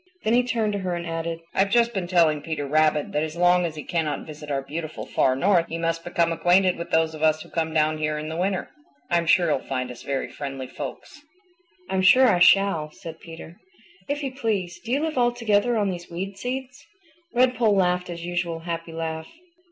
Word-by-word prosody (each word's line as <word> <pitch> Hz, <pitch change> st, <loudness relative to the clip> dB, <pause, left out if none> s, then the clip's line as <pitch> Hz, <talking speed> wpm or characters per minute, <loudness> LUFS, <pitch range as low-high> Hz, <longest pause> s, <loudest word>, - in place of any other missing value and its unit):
Then 220 Hz, -, +1 dB
he 245 Hz, -, +5 dB
turned 230 Hz, -4 st, -1 dB
to 200 Hz, -, -2 dB
her 185 Hz, -2 st, -2 dB
and 170 Hz, 0 st, -5 dB
added, 165 Hz, 0 st, -4 dB
"I've 195 Hz, +1 st, +2 dB
just 235 Hz, +2 st, +3 dB
been 190 Hz, -4 st, -2 dB
telling 165 Hz, -4 st, +3 dB
Peter 155 Hz, -3 st, -4 dB
Rabbit 155 Hz, +1 st, +2 dB
that 150 Hz, -, 0 dB
as 155 Hz, 0 st, -3 dB
long 180 Hz, 0 st, +3 dB
as 160 Hz, -, -8 dB
he 150 Hz, -, -6 dB
cannot 155 Hz, -4 st, -2 dB
visit 150 Hz, -1 st, -10 dB
our 135 Hz, -1 st, -1 dB
beautiful 155 Hz, +3 st, -6 dB
Far 130 Hz, -, +2 dB
North 175 Hz, +3 st, +3 dB
he 165 Hz, -, -3 dB
must 165 Hz, 0 st, -1 dB
become 170 Hz, -1 st, +1 dB
acquainted 175 Hz, +3 st, +3 dB
with 170 Hz, -, -6 dB
those 160 Hz, 0 st, +2 dB
of 155 Hz, -, -9 dB
us 155 Hz, 0 st, +2 dB
who -, -, -17 dB
come 160 Hz, -1 st, -1 dB
down 155 Hz, 0 st, +1 dB
here 155 Hz, 0 st, -1 dB
in 150 Hz, 0 st, -5 dB
the 160 Hz, -, -5 dB
winter. 185 Hz, +2 st, -1 dB, 0.4 s
I'm 170 Hz, -1 st, +2 dB
sure 175 Hz, +2 st, +5 dB
he'll 150 Hz, -4 st, +1 dB
find 130 Hz, -2 st, -4 dB
us 120 Hz, -, -11 dB
very 135 Hz, -1 st, -2 dB
friendly 135 Hz, -2 st, -6 dB
folks." 140 Hz, -, -8 dB, 0.7 s
"I'm 190 Hz, 0 st, 0 dB
sure 255 Hz, +8 st, +7 dB
I 185 Hz, -7 st, +3 dB
shall," 175 Hz, -4 st, +4 dB
said 165 Hz, +1 st, -10 dB
Peter. 165 Hz, +1 st, -11 dB, 0.5 s
"If 290 Hz, +1 st, -2 dB
you 270 Hz, -, -2 dB
please, 205 Hz, -9 st, -2 dB
do 235 Hz, -, -7 dB
you 275 Hz, +3 st, +2 dB
live 315 Hz, -4 st, -1 dB
altogether 240 Hz, -1 st, +2 dB
on 205 Hz, -2 st, +1 dB
these 175 Hz, -1 st, -7 dB
weed 190 Hz, +3 st, -5 dB
seeds?" 255 Hz, +5 st, -5 dB, 0.5 s
Redpoll 245 Hz, -4 st, +3 dB
laughed 180 Hz, -1 st, +1 dB
his 170 Hz, -1 st, -6 dB
usual 175 Hz, -2 st, -2 dB
happy 165 Hz, -1 st, -5 dB
laugh. 160 Hz, -1 st, -4 dB
170 Hz, 215 wpm, -24 LUFS, 155-195 Hz, 0.7 s, sure